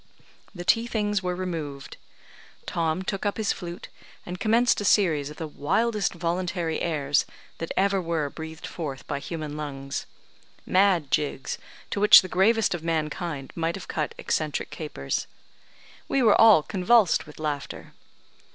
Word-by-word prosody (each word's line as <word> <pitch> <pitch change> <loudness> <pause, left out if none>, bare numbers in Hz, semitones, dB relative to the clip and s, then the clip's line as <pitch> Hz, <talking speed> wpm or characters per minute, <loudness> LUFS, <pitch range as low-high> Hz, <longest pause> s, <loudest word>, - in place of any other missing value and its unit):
The 175 -1 -7
tea 230 +4 +3
things 210 -3 0
were 180 -1 -2
removed. 160 -7 -5 0.7
Tom 165 +2 -1
took 195 0 -3
up 205 -1 -1
his 220 -2 +1
flute, 175 -1 -8 0.4
and 180 +1 -6
commenced 230 +1 +3
a - - -2
series 165 -9 +3
of 150 - -11
the 165 - -4
wildest 205 +8 0
voluntary 170 -1 -2
airs 145 -4 +1 0.4
that 165 - -4
ever 195 0 +2
were 165 -3 -1
breathed 160 0 -8
forth 140 -6 -6
by - - -3
human 155 -1 -5
lungs. 140 -2 -5 0.6
Mad 185 -7 +3
jigs, 140 -2 -1 0.3
to - - -1
which 210 -1 +9
the - - -5
gravest 210 +5 +3
of 170 -2 -5
mankind 155 -3 -3
might 165 0 -1
have 195 - -8
cut 155 -2 -3
eccentric 155 -2 -2
capers. 150 - -4 0.8
We 270 - +1
were 215 -3 +5
all 220 -9 +8
convulsed 195 -1 +3
with 150 - -13
laughter. 150 -2 -5
170 Hz, 150 wpm, -26 LUFS, 150-195 Hz, 0.8 s, which